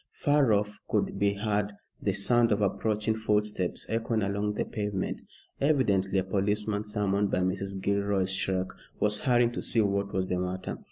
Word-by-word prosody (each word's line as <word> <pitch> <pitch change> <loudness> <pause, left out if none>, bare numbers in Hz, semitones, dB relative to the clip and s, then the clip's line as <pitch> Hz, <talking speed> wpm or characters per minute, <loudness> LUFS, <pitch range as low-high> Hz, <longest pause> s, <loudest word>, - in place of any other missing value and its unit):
Far 145 -5 +3
off 105 0 0
could - - 0
be 100 0 +2
heard 105 0 -1 0.3
the 100 - 0
sound 115 +4 +3
of 105 0 +2
approaching 105 +2 0
footsteps 105 -4 0
echoing 115 -1 0
along 100 +1 -1
the - - -1
pavement. 105 -4 -3 0.4
Evidently 100 -10 +2
a 95 - +2
policeman, 105 +2 0
summoned 105 -1 0
by 90 - +1
Mrs. 95 +1 -2
Gilroy's 100 -1 0
shriek, 95 -1 -1 0.3
was 105 0 +2
hurrying 120 -2 +3
to - - -4
see 115 - -1
what 100 -1 0
was 95 0 -1
the 90 0 -1
matter. 90 +1 -4
105 Hz, 165 wpm, -29 LUFS, 95-110 Hz, 0.4 s, Far